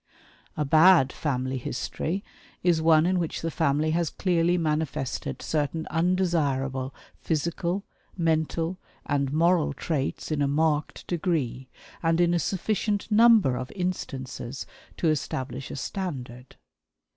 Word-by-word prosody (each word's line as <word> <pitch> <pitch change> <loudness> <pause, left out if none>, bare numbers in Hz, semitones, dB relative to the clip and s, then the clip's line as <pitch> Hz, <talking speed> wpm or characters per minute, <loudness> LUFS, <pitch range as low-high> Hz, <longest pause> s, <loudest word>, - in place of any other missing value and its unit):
A 150 - 0
"bad 155 -2 +6
family 130 -3 -2
history" 155 - -3 0.4
is 170 -3 +3
one 160 0 +5
in 185 0 +2
which 165 -2 -3
the 165 - -1
family 155 0 +1
has 170 -1 +1
clearly 175 -1 +1
manifested 155 -5 -2
certain 155 +1 -1
undesirable 150 -7 0 0.3
physical, 170 +4 -1 0.3
mental, 165 +1 0 0.3
and 140 -2 0
moral 165 0 +3
traits 145 0 -3
in 150 -2 0
a 140 - +3
marked 150 -2 0
degree, 155 -7 -2 0.3
and 165 0 +2
in 175 0 +4
a 175 - +2
sufficient 205 +4 -1
number 220 - +6
of 125 +1 -5
instances 135 -8 -4 0.3
to 170 - 0
establish 135 -3 -3
a - - -6
standard. 130 -6 -5
160 Hz, 120 wpm, -26 LUFS, 140-175 Hz, 0.4 s, bad